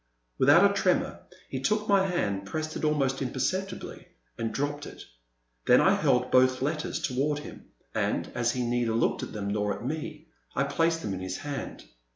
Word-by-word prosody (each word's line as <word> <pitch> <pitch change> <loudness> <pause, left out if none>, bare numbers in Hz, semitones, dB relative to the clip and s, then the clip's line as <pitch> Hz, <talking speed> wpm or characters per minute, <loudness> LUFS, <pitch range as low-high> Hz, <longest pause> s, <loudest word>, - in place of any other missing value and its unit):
Without - - +7
a - - -1
tremor - - +1 0.3
he 130 - -4
took 210 +10 0
my 195 -1 +4
hand, 100 - -1
pressed 155 +8 -3
it - - -5
almost 140 -3 +1
imperceptibly, 135 +10 -3 0.3
and 115 -1 -2
dropped 145 +1 -2
it. - - -10 0.6
Then - - +7
I - - +5
held 125 0 +2
both 130 0 +4
letters 150 +2 -1
toward 140 +3 0
him, 145 - -9 0.3
and, - - -1
as 120 0 +1
he 125 - -1
neither 120 -1 0
looked 115 - +1
at - - -5
them 100 -1 -4
nor 105 0 0
at 105 - -8
me, 155 +2 -4 0.3
I 140 - +2
placed 165 +4 +1
them 100 - -2
in 95 - -4
his 95 0 -4
hand. 145 -2 -6
135 Hz, 185 wpm, -28 LUFS, 120-155 Hz, 0.6 s, Without